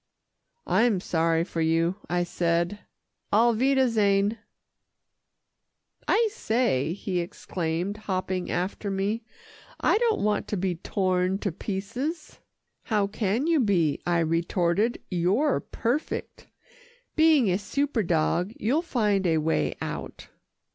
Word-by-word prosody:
"I'm 225 -4 +3
sorry 165 -2 +1
for 170 -2 -4
you," 165 +3 +1
I 175 0 +1
said, 170 +3 0 0.5
"auf 230 +3 +4
wiedersehen." 225 -5 +2 1.7
"I 455 -1 +3
say," 220 - 0
he 185 -1 -2
exclaimed 175 +2 -3
hopping 185 -3 -3
after 190 +3 -2
me, 200 +4 -1 0.6
"I - - +3
don't 460 -3 +1
want 210 0 0
to 205 - -2
be 185 0 0
torn 185 0 0
to 200 - +1
pieces." 225 - -4 0.5
"How 210 -3 +1
can 210 +5 -1
you 330 -2 +3
be," 180 - +2
I 175 -1 +1
retorted, 170 +6 +1
"you're 195 - +2
perfect 245 +7 -3 0.7
being 310 - +5
a 180 - +1
super 275 +4 -1
dog, 175 +2 0
you'll 265 +9 +1
find 210 - +1
a 165 -1 +2
way 155 +1 0
out." - - -6
200 Hz, 115 wpm, -26 LUFS, 175-230 Hz, 1.7 s, being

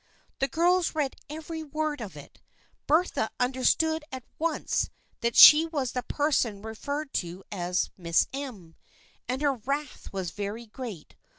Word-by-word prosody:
The 270 - +2
girls 345 +2 +2
read 290 -4 -1
every 320 +1 -6
word 305 -1 -3
of 210 -4 -7
it. - - -13 0.5
Bertha 310 -7 +2
under 255 +1 0
stood 320 +3 +2
at 260 -2 -6 0.2
once 325 -1 0 0.3
that 235 0 -1
she 310 +2 +10
was 280 -7 -2
the 250 - -2
person 245 -7 0
referred 280 +7 -5
to 175 +2 -9
as 180 -2 -1
" - - -52
Miss 170 -2 +2
M." 225 - -7 0.5
and 255 +4 -2
her 285 -1 +3
wrath 275 +4 -4
was 190 -4 -4
very 205 +5 -5
great. 220 - -8
265 Hz, 155 wpm, -27 LUFS, 210-305 Hz, 0.5 s, she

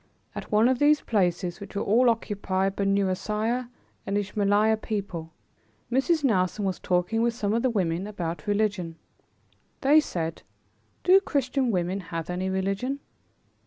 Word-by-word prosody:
At - - -7
one 215 +2 +5
of 255 -1 +1
these 295 +1 +4
places, 180 -3 0
which 200 0 -10
were 200 - -1
all 240 +5 +4
occupied 195 -4 -1
by 200 - -1
Nusairiyeh 210 +5 0 0.4
and 200 +1 0
Ismaeliyeh 205 +2 +2
people, 185 -6 -4 0.6
Mrs. 290 +5 +2
Nelson 200 -4 +1
was 190 -3 -2
talking 180 +5 0
with 235 0 +1
some 210 -3 -1
of 230 - +1
the 255 - +2
women 185 -4 -1
about 175 -2 -5
religion. 205 -5 0 0.9
They 290 +3 +6
said, 165 - -3 0.6
"Do 375 +2 +7
Christian 270 -6 0
women 185 -1 0
have 165 -2 -5
any 185 +1 -2
religion?" 195 +8 -1
205 Hz, 145 wpm, -26 LUFS, 185-235 Hz, 0.9 s, Do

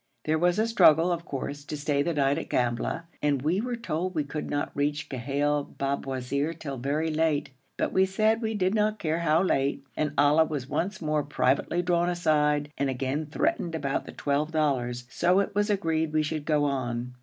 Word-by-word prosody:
There 155 +1 +1
was 175 +2 +2
a 220 - +3
struggle, 170 -6 +5
of 170 -1 -2
course, 145 -1 -5
to 150 - -5
stay 145 -1 0
the 170 +2 -1
night 140 +1 +2
at - - -7
Gambla, 120 +6 -1 0.2
and 145 -3 +1
we 175 +7 +1
were 245 +1 -2
told 185 -5 -3
we 155 - +1
could 150 +2 -5
not 145 0 -2
reach 145 +1 -1
Ghail 140 +3 -1
Babwazir 140 +2 -2
till 140 -3 -5
very 150 +5 -1
late, 155 -3 0 0.3
but - - -1
we 190 0 +4
said 215 +4 +2
we 220 -1 -1
did 190 -1 +1
not 215 0 +1
care 160 -3 -1
how 165 +1 +3
late, 140 -6 0
and 150 -2 -1
Ali 150 +3 +5
was 140 -5 -4
once 190 +4 -2
more 155 -1 +1
privately 145 +4 0
drawn 175 0 +2
aside, 150 -4 +1
and 140 -1 +1
again 135 +4 -2
threatened 175 - -1
about 140 -3 -2
the - - -6
twelve 145 +2 -1
dollars, 125 -6 0
so 180 +6 +3
it 200 - -1
was 205 +1 +1
agreed 160 -6 0
we 155 0 +2
should 155 -1 -3
go 150 -2 +2
on. 125 -3 -2
155 Hz, 200 wpm, -27 LUFS, 140-175 Hz, 0.3 s, struggle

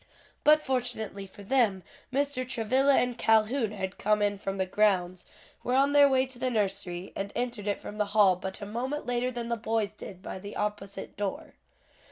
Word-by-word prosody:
But 305 +1 +6
fortunately 220 -7 -2
for 200 +2 -13
them, 205 -5 +2 0.3
Mr. 280 -1 0
Travilla 260 +4 +3
and 245 -1 +1
Calhoun 220 +1 +3
had 190 -2 -5
come 210 +1 +2
in 205 -1 0
from 195 0 -3
the 190 - +1
grounds, 185 -2 +1 0.4
were 250 - 0
on 275 +2 +4
their 285 -1 +7
way 260 -1 +3
to 260 -2 -14
the 255 - 0
nursery, 190 -5 -2
and 200 +1 -4
entered 240 -4 -3
it 205 - 0
from 210 - -8
the 210 - +3
hall 195 -3 +6
but 190 +3 -6
a - - -4
moment 255 +8 -3
later 245 0 0
than 240 -2 -5
the 235 - 0
boys 225 -1 -1
did 185 -1 -10
by - - -6
the 200 +2 -8
opposite 205 -1 -4
door. 200 -1 -4
215 Hz, 195 wpm, -29 LUFS, 200-255 Hz, 0.4 s, their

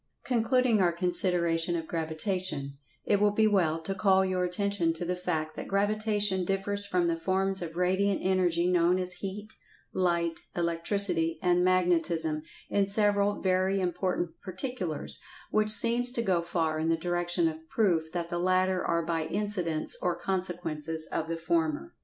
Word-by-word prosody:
Concluding 245 -2 +2
our 175 -2 +3
consideration 175 -1 +2
of 165 -1 -3
Gravitation, 160 -2 -3 0.3
it 205 - +2
will 210 0 +4
be 215 +2 +2
well 175 -7 +2
to 195 - -2
call 190 -1 +3
your 185 -1 -1
attention 180 -2 0
to 165 +2 -5
the 180 - -1
fact[Pg 155 -3 -3
142] - - -3
that - - -9
Gravitation 205 -1 +1
differs 200 +2 -1
from 180 -3 +1
the 170 - 0
forms 190 +3 0
of 165 -1 -6
Radiant 190 +2 +1
Energy 180 -2 +1
known 180 0 +3
as 180 -1 +2
Heat, 205 +2 -6 0.4
Light, 170 -2 0 0.2
Electricity 170 0 0
and 180 0 +3
Magnetism 170 -4 +1 0.3
in 200 -1 +1
several 205 0 +1
very 190 +1 +1
important 180 -2 -2
particulars, 185 - -4 0.3
which 215 0 +1
seems 235 +3 +6
to 235 - -1
go 185 -5 +1
far 165 -2 -2
in 160 +1 -1
the 165 - +2
direction 175 0 0
of 160 0 -7
proof 170 -7 0
that 170 -1 -3
the 175 - -2
latter 185 +1 +1
are 170 -1 0
by 165 -1 -1
incidents 180 -4 0
or 180 -1 0
consequences 170 -4 -3
of 160 - -2
the 165 - -2
former. 165 - -1
180 Hz, 160 wpm, -28 LUFS, 165-195 Hz, 0.4 s, seems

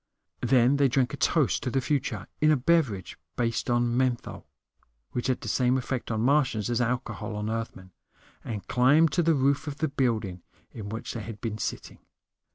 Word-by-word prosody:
Then 130 +1 +4
they 140 -1 +4
drank 130 +1 +1
a - - -1
toast 150 -1 +2
to 130 - -2
the 135 - +1
future 130 -6 -1 0.2
in 155 - +5
a 155 - +5
beverage 130 - 0 0.2
based 115 -1 -1
on 120 0 +2
menthol, 125 -2 -1 0.6
which 120 - -2
had 130 - 0
the - - -7
same 125 0 +2
effect 130 -1 -3
on 110 -1 -1
Martians 125 -4 +2
as 120 +1 +1
alcohol 120 -3 -2
on 105 +1 -3
Earthmen 110 -5 -5 0.5
and 105 -4 -5
climbed 145 +6 +4
to 175 - +2
the 165 -1 +3
roof 140 +2 +1
of 145 -1 -4
the 160 - 0
building 110 -9 -1 0.3
in 105 -3 -7
which 110 +2 -5
they 115 - -5
had 105 -1 -8
been 110 -2 -4
sitting. - - -5
125 Hz, 185 wpm, -27 LUFS, 115-140 Hz, 0.6 s, in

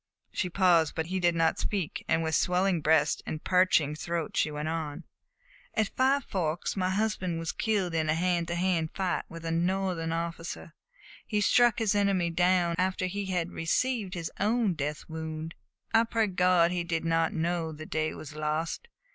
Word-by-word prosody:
She 180 - -2
paused, 175 -4 +3
but 160 - -1
he 185 +3 -2
did 175 -1 +2
not 165 -1 +2
speak, 195 -7 -2
and 165 +1 +2
with 160 0 -2
swelling 180 0 +2
breast 160 +1 +3
and 155 - -4
parching 180 -5 +3
throat 165 +1 -3
she - - +2
went 150 0 -4
on: 160 -2 -3 0.7
"At 215 -3 +1
Five 270 +2 +2
Forks 170 -4 -2
my 185 -2 0
husband 190 -4 -1
was 165 -1 -2
killed 200 -6 0
in 160 -1 0
a 155 - +3
hand 175 0 0
to 170 - -2
hand 175 -3 +1
fight 185 -2 -1
with 165 0 -9
a 165 - -1
Northern 175 -1 0
officer. 165 -1 -4 0.5
He 210 - 0
struck 240 +2 +4
his 220 -3 +1
enemy 195 -4 +2
down 175 0 +2
after 185 0 0
he 195 +2 -3
had 180 -2 -1
received 205 +3 -1
his 165 -2 -4
own 215 -1 +2
death 150 -1 -4
wound. 160 0 -5 0.4
I 225 0 +6
pray 225 -1 +1
God 180 -3 +3
he 180 -1 -1
did 165 -1 -2
not 165 0 +2
know 165 0 -1
the 155 0 -8
day 155 0 -2
was 155 0 -9
lost. 155 - -2
170 Hz, 180 wpm, -29 LUFS, 160-190 Hz, 0.7 s, I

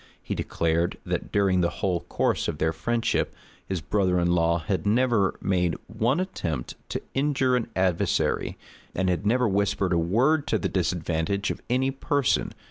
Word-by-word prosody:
He - - -3
declared, 85 +1 0
that - - -3
during 95 -3 +3
the 85 - +2
whole 90 +2 -1
course - - -1
of - - -2
their 80 +1 +1
friendship, 115 +9 0 0.3
his 95 -3 -2
brother 90 +1 +1
in 85 0 +2
law 85 -1 +3
had 90 +3 -2
never 110 -2 +2
made 90 -3 +1
one 115 +7 0
attempt 85 - -3 0.2
to - - -3
injure 135 -2 +2
an 125 - 0
adversary, 95 -2 +1 0.4
and 95 0 +1
had 90 +3 0
never 125 +2 +3
whispered 100 -2 +1
a 85 - +3
word 130 - +2
to 110 - +2
the 95 - -2
disadvantage 90 +2 -1
of - - -6
any 130 +2 +2
person. 140 -1 0
95 Hz, 165 wpm, -26 LUFS, 85-120 Hz, 0.4 s, during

